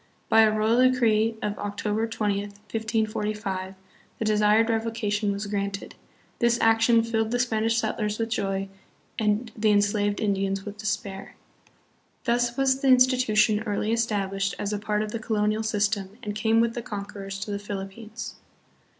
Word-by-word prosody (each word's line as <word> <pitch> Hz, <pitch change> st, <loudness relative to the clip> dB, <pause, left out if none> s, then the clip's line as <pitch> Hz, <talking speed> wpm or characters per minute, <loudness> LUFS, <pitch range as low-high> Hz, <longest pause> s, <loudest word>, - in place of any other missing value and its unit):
By 225 Hz, -, +6 dB
a 220 Hz, -1 st, +5 dB
royal 225 Hz, +4 st, +4 dB
decree 225 Hz, -3 st, +2 dB
of 210 Hz, 0 st, -2 dB
October 210 Hz, +2 st, -2 dB
20, 210 Hz, -3 st, -1 dB
1545, 210 Hz, -2 st, -3 dB, 0.4 s
the 220 Hz, -, -2 dB
desired 215 Hz, +1 st, +4 dB
revocation 220 Hz, -2 st, -1 dB
was 200 Hz, +1 st, -3 dB
granted. 200 Hz, -1 st, -3 dB, 0.5 s
This 235 Hz, 0 st, +3 dB
action 225 Hz, +1 st, +4 dB
filled 225 Hz, -1 st, 0 dB
the 245 Hz, -, 0 dB
Spanish 225 Hz, -2 st, +1 dB
settlers 215 Hz, -1 st, -1 dB
with 225 Hz, 0 st, -2 dB
joy 195 Hz, -3 st, -1 dB, 0.5 s
and 215 Hz, +2 st, 0 dB
the 215 Hz, -1 st, +2 dB
en 205 Hz, -1 st, +5 dB
slaved 205 Hz, 0 st, 0 dB
Indians 195 Hz, -2 st, -1 dB
with 205 Hz, 0 st, -8 dB
despair." 200 Hz, -2 st, -4 dB
l -, -, -32 dB, 0.9 s
Thus 240 Hz, 0 st, +1 dB
was 270 Hz, 0 st, +2 dB
the 275 Hz, -, +1 dB
institution 250 Hz, -5 st, +4 dB
early 210 Hz, +1 st, -1 dB
established 195 Hz, -4 st, -1 dB
as 205 Hz, +1 st, -2 dB
a 205 Hz, -, -2 dB
part 210 Hz, 0 st, -1 dB
of 215 Hz, -, -5 dB
the 230 Hz, -, -3 dB
colonial 215 Hz, 0 st, 0 dB
system 205 Hz, -2 st, -1 dB
and 210 Hz, -2 st, -3 dB
came 220 Hz, +1 st, +2 dB
with 230 Hz, 0 st, +1 dB
the 240 Hz, -, -4 dB
conquerors 200 Hz, -2 st, -6 dB
to 205 Hz, -, -4 dB
the 200 Hz, -, -2 dB
Philippines. 210 Hz, +2 st, -7 dB
215 Hz, 160 wpm, -26 LUFS, 205-225 Hz, 0.9 s, By